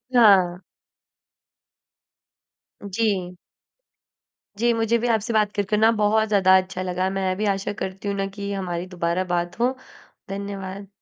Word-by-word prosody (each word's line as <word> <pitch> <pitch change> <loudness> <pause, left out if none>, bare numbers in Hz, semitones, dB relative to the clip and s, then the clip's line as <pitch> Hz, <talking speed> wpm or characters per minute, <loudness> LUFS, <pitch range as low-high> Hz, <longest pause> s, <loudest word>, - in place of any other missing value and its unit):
हाँ। 190 -6 +5 2.3
जी। 190 -4 -1 1.2
जी, 235 +2 +2
मुझे 225 +1 +1
भी 240 +1 -1
आपसे 225 0 0
बात 210 -1 +2
करके 205 +1 0
ना, 220 +1 +5
बहुत 220 0 +2
ज़्यादा 190 -3 +5
अच्छा 185 0 -3
लगा। 185 +1 -1
मैं 190 -1 -1
भी 215 - -1
आशा 195 +1 -4
करती 190 +2 -5
हूँ 200 - -1
ना 195 - 0
कि 200 -1 -4
हमारी 180 -2 -3
दोबारा 175 0 -1
बात 175 +5 -3
हो। 250 +2 +1 0.5
धन्यवाद। 195 0 -6
195 Hz, 135 wpm, -23 LUFS, 185-215 Hz, 2.3 s, हाँ